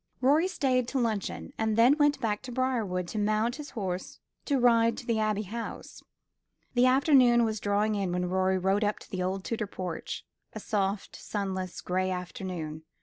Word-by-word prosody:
Rorie 290 +7 +4
stayed 255 -9 +1
to 270 - -2
luncheon, 220 -4 -2
and 220 -1 +1
then 245 +5 +6
went 290 -2 +3
back 215 -4 -1
to 255 - -8
Briarwood 230 -9 -1
to 215 - -3
mount 215 +4 +1
his 300 -1 -7
horse 185 -3 -4 0.3
to 280 - +1
ride 230 -2 +4
to - - -7
the 230 -2 0
Abbey 215 -1 0
House. 225 +3 -7 0.7
The 245 +1 +4
afternoon 255 -3 +5
was 220 -2 -1
drawing 205 +1 +1
in 195 -3 -1
when 180 0 0
Rorie 185 +1 +1
rode 195 +3 +1
up 210 0 0
to - - -15
the 185 - -2
old 185 +1 -2
Tudor 225 -1 -2
porch 180 -4 -5 0.3
a - - -5
soft, 200 -2 -2
sunless, 190 -3 -4
gray 185 +1 0
afternoon. 180 -4 -5
215 Hz, 180 wpm, -29 LUFS, 190-245 Hz, 0.7 s, then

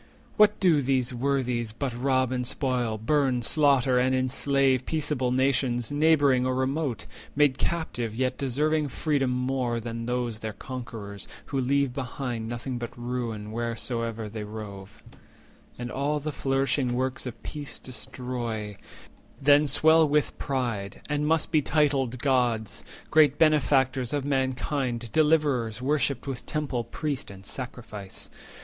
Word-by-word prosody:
What 210 0 +5
do 170 -7 +4
these 130 -2 +1
worthies 125 -3 0
But 130 +2 -3
rob 130 +1 +1
and 125 -1 -1
spoil, 125 -5 0
burn, 130 +1 +1
slaughter, 135 -2 +3
and 130 +1 +2
enslave 130 0 +2
Peaceable 145 -5 0
nations, 125 -2 +1
neighbouring 145 -4 +4
or 130 0 0
remote, 130 -3 -1 0.3
Made 145 -2 +3
captive, 125 -10 -2
yet 130 +1 0
deserving 150 +3 0
freedom 140 0 0
more 125 -1 0
Than 115 0 -5
those 120 -3 -2
their 110 -1 -5
conquerors, 115 -5 -7 0.2
who 135 -2 -1
leave 140 0 +1
behind 125 -4 -4
Nothing 120 +2 -4
but 120 0 -6
ruin 120 -3 -4
wheresoe'er 115 -1 -3
they 105 0 -6
rove, 105 -2 -9 0.7
And 120 0 -5
all 145 +3 0
the 155 +1 -3
flourishing 135 -2 0
works 130 +1 -2
of 120 - -8
peace 145 -2 -5
destroy; 125 -4 -5
80 100 - -14 0.6
Then 145 +2 +5
swell 160 +2 +6
with 150 0 +1
pride, 120 -8 -2
and 150 0 0
must 160 0 +2
be 155 -2 +4
titled 140 -4 +1
Gods, 120 -4 0 0.3
Great 150 -3 +5
benefactors 135 -4 +3
of 145 -2 -1
mankind, 130 -3 -1
Deliverers, 150 -8 +2
Worshipped 140 -1 0
with 135 -3 -5
temple, 140 -6 -2
priest, 150 -4 -3
and 95 -1 -12
sacrifice? 110 -6 -7
130 Hz, 135 wpm, -27 LUFS, 120-140 Hz, 0.7 s, swell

